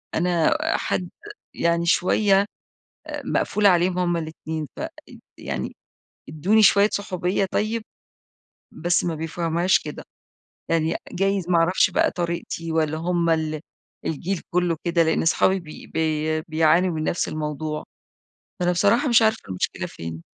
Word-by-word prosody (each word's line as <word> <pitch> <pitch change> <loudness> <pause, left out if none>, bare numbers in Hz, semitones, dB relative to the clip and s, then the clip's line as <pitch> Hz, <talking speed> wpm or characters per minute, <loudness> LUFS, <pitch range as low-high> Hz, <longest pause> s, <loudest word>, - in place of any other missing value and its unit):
أنا 175 - +2 0.2
حد 180 -2 -2 0.4
يعني 170 0 +1
شوية 195 +3 +3 0.6
آآ، - - -5
مقفولة 210 -1 +2
عليهم 180 0 +2
هما 175 -1 +1
الاتنين، 160 -1 -5
فإد - - -8 0.2
يعني 65 -2 -4 0.5
ادوني 190 +9 +2
شوية 200 0 +6
صحوبية 190 -1 -1
طيب. 220 +2 0 0.9
بس 175 0 0
ما 170 -2 -1
بيفهموهاش 165 +3 +1
كده، - - -8 0.7
يعني 165 -1 +1 0.2
جايز 195 -1 0
ما 175 - +4
أعرفش 175 +3 +3
بقى - - +2
طريقتي 170 -1 -3
والّا 155 -1 0
همَّا 170 0 +1
ال 155 -1 -2 0.5
الجيل 170 +4 -2
كله 175 -2 +1
كده، 170 -1 +2
لأن 160 0 +1
صحابي 190 +3 +3
بي 155 -3 -11
بي 155 0 -1
بِيعانوا 165 +3 +2
من 155 - -2
نفس 170 - 0
الموضوع. 150 0 -4 0.8
فأنا 180 0 +2
بصراحة 210 - +3
مش 235 -2 +5
عارفة 220 0 +3
المشكلة 90 - -2
فين؟ 80 0 -8
170 Hz, 135 wpm, -23 LUFS, 160-185 Hz, 0.9 s, شوية